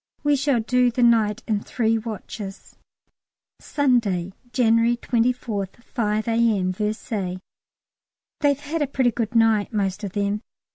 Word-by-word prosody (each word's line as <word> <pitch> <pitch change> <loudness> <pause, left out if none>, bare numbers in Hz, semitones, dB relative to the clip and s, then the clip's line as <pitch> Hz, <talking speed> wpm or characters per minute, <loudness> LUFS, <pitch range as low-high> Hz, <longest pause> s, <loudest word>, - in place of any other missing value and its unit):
We 290 0 +3
shall 280 -2 +1
do 250 +2 +3
the 245 +1 0
night 225 -1 +3
in 215 -3 +1
three 225 0 0
watches. 215 -3 -7 0.8
Sunday, 215 - 0 0.2
January 230 -1 +3
24th, 235 -4 -1
5 215 -3 -1
A.M., 225 -5 +2
Versailles. 210 -2 -3 1.0
They've 285 -2 +2
had 300 +2 -3
a 290 - +1
pretty 260 -2 +1
good 230 +1 -3
night 225 -2 +3
most 200 -1 -1
of 195 -2 -4
them. 205 0 -1
225 Hz, 130 wpm, -23 LUFS, 210-245 Hz, 1.0 s, We